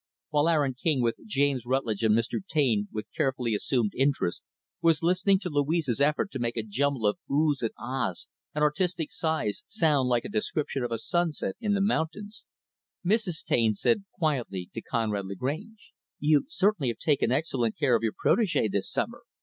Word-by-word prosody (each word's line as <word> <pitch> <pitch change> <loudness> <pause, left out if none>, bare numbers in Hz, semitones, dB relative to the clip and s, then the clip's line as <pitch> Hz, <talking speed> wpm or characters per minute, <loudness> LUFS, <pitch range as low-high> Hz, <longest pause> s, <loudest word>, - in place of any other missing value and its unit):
While 150 +1 +2
Aaron 145 -5 +2
King, 130 0 0
with 115 0 0
James 140 - +1
Rutlidge 120 -4 -1
and 110 -1 +4
Mr. 115 +9 -1
Taine, 125 - +1
with 105 0 -6
carefully 130 -4 0
assumed 110 0 0
interest, 135 -9 +1 0.4
was 165 -1 +3
listening 185 +3 +4
to 180 - -3
Louise's 145 -3 +1
effort 150 +7 +2
to 135 - -4
make 120 0 -2
a 110 - 0
jumble 130 +3 -1
of 105 - +1
"ohs" 145 0 +2
and 115 - 0
"ahs" 120 -6 -3 0.3
and 150 - +1
artistic 165 +2 0
sighs 160 -10 -1
sound 145 -6 +2
like 120 -1 +1
a - - -2
description 160 -10 -1
of 120 - -3
a 115 - 0
sunset 165 - -1
in 205 -1 +1
the 200 - +1
mountains, 205 +1 -2 0.6
Mrs. 190 -4 +1
Taine 110 -3 +2
said 205 - +1
quietly 125 - -2
to 115 - -5
Conrad 105 -5 -2
Lagrange, 155 - -5 0.3
"You 150 -1 +3
certainly 205 - +1
have 115 -2 -1
taken 145 -6 +1
excellent 130 -6 0
care 140 -5 +3
of 115 - +1
your 115 -2 0
protege, 195 - +2
this 100 0 -1
summer. - - -2
140 Hz, 175 wpm, -28 LUFS, 115-165 Hz, 0.6 s, and